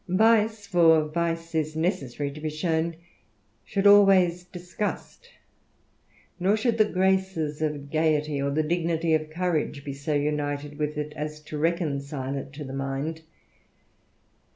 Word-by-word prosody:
Vice, 215 +2 +3
for 165 -5 +4
vice 165 +1 -2
is 155 -1 -1
necessary 145 - -2
to 150 +2 -10
be 155 - -2
shown, 160 +1 -1 0.7
should 200 -1 -2
always 195 -4 +6
disgust; 180 - -6 1.1
nor 195 +4 +2
should 230 +1 0
the 215 - +6
graces 190 -5 0
of 145 -2 -3
gaiety, 155 -2 +1
or 140 - 0
the 155 +3 +1
dignity 165 0 0
of 155 0 0
courage, 155 -4 -2
be 140 - -4
so 145 +2 -3
united 145 0 -2
with 150 0 -2
it, 150 0 -4
as 150 0 -5
to 150 0 -9
reconcile 145 -4 -2
it 135 0 -6
to 145 +1 -8
the 135 -1 -7
mind. 135 +4 -3
155 Hz, 140 wpm, -26 LUFS, 150-180 Hz, 1.1 s, always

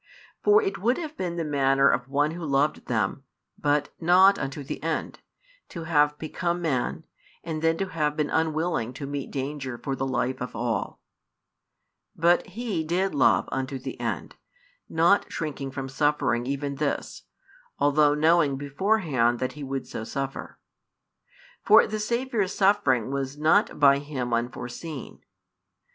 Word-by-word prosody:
For 425 +1 +5
it 395 - -2
would 240 +6 +1
have 315 -3 -6
been 175 - -3
the 170 - -2
manner 135 -2 +3
of 125 -2 +1
one 145 +2 +1
who 170 +1 -7
loved 145 0 0
them, 115 +2 -1 0.3
but 145 0 0
not 185 +4 +5
unto 140 +1 -4
the 135 - -6
end, - - -3 0.5
to 170 - -7
have 150 -2 +2
become 170 +3 -2
man, 145 -8 -1 0.4
and 160 -2 -4
then 165 0 +2
to 195 +1 -2
have 150 -3 -1
been 150 -1 0
unwilling 160 -6 0
to 135 +2 -6
meet 140 -1 -4
danger 135 -2 -4
for 135 +2 -3
the 135 0 -2
life 130 0 -1
of 125 -2 -5
all; 115 -2 -2 1.2
but 170 +4 +3
He 205 -4 -3
did 180 +4 0
love 130 -5 +3
unto 135 +1 -3
the 130 - -7
end, - - -4 0.5
not 170 +5 +3
shrinking 145 -4 -4
from 135 0 -5
suffering 135 -4 0
even 140 0 -3
this, 145 -1 -2 0.6
although 145 +1 +3
knowing 155 -2 +3
beforehand 140 - +1
that 130 +1 -2
He 145 +2 -9
would 135 0 -4
so - - -6
suffer. 135 +3 -5 1.1
For - - +7
the 215 - -4
Saviour's 230 -3 -1
suffering 190 - +2
was 140 0 -3
not 160 +8 +2
by 140 -1 +6
Him 135 -4 -4
unforeseen. 125 +5 -5
145 Hz, 150 wpm, -26 LUFS, 135-170 Hz, 1.2 s, For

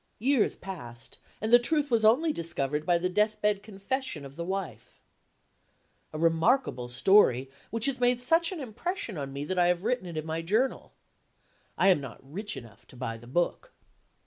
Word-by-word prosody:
Years 255 0 +2
passed; 120 -11 -8 0.2
and 220 +2 -1
the 240 - +10
truth 290 +3 0
was 230 -2 +3
only 280 +9 +4
discovered 150 - -2
by 175 -1 +4
the 175 +2 -1
death 210 +3 +1
bed 210 -1 +1
confession 210 - -4
of 140 0 -11
the 170 - -4
wife. 175 - -5 1.1
A 155 - -6
remarkable 165 - +2
story, 135 -3 +4 0.2
which 230 0 0
has 275 -2 +1
made 245 0 +3
such 330 +7 +3
an 365 - -5
impression 260 - -4
on 140 -3 -5
me 140 +1 -5
that 185 +3 -1
I 175 - +4
have 175 0 +1
written 245 -4 -1
it 170 -2 -6
in 155 - -3
my 160 +1 -3
Journal. 220 +10 0 0.9
I 195 - +4
am 180 -6 +4
not 135 -4 -8
rich 190 +10 -6
enough 115 0 -13
to - - -16
buy 120 -2 -4
the 120 +1 -14
book. 175 - -1
190 Hz, 185 wpm, -28 LUFS, 150-240 Hz, 1.1 s, the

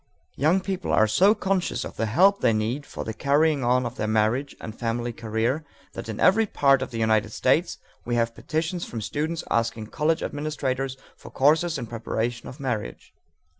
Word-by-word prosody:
Young 160 +7 +2
people 190 -1 -3
are 110 - +5
so 190 - +4
conscious 190 -3 -1
of - - -8
the 115 - -1
help 190 - +4
they 115 - +4
need 115 +7 -2
for - - -6
the 110 - -4
carrying 145 +3 +2
on 125 +1 +2
of 120 +1 -5
their 105 - -1
marriage 110 +6 +1
and 110 - -7
family 120 0 -2
career 115 +6 -1 0.3
that - - -7
in 110 - -5
every 220 +4 +4
part 140 -7 +3
of - - -3
the 115 - -6
United 110 -1 +2
States 155 +7 +1 0.3
we 120 - -2
have 115 -1 +1
petitions 160 +7 -3
from 115 - -5
students 155 +9 -2
asking 115 -1 0
college 160 +1 +1
administrators 135 -3 -2 0.2
for - - -13
courses 160 +4 +2
in - - -4
preparation 115 +1 -3
for 135 +1 -11
marriage. 110 - -4
130 Hz, 185 wpm, -25 LUFS, 115-155 Hz, 0.3 s, are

